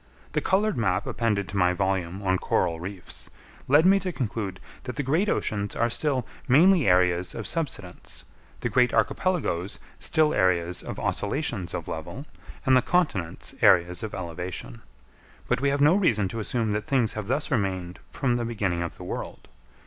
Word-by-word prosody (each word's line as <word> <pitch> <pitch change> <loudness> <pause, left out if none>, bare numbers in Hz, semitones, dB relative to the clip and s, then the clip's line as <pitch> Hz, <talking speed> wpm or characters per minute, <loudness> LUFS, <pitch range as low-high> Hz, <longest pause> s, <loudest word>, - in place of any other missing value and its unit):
The - - 0
coloured 205 +2 +1
map 95 -6 +1
appended 105 -4 -1
to 100 - -4
my 90 -1 +3
volume 95 0 -1
on 95 -1 +1
Coral 85 -2 0
Reefs, 90 0 -7 0.4
led 145 +5 +5
me 195 +1 +6
to 185 -2 -3
conclude 110 - -3 0.3
that 125 - -5
the 145 - -2
great 160 +10 +1
oceans 105 -1 -1
are 120 0 +1
still 130 -2 0 0.2
mainly 165 - +5
areas 90 -1 +3
of 115 - -5
subsidence, 135 - -4 0.4
the - - 0
great 125 -1 +3
archipelagoes 125 - 0 0.2
still 155 -2 +2
areas 90 -1 +1
of - - -7
oscillations 115 - -2
of - - -5
level, 80 - -6 0.4
and 130 -1 +5
the 130 - +5
continents 125 - -1
areas 90 +1 +4
of 110 -2 -5
elevation. 85 -8 -5 0.7
But 125 +1 0
we 140 - +3
have 140 0 0
no 150 +3 +6
reason 120 - +2
to 115 - -5
assume 110 0 -1
that 105 +1 -2
things 125 -5 +2
have 105 -2 -5
thus 140 +6 -1
remained 95 -6 -1
from 125 -4 0
the 120 - -2
beginning 100 -7 -1
of 85 - -5
the - - -9
world. - - -6
110 Hz, 170 wpm, -26 LUFS, 90-140 Hz, 0.7 s, me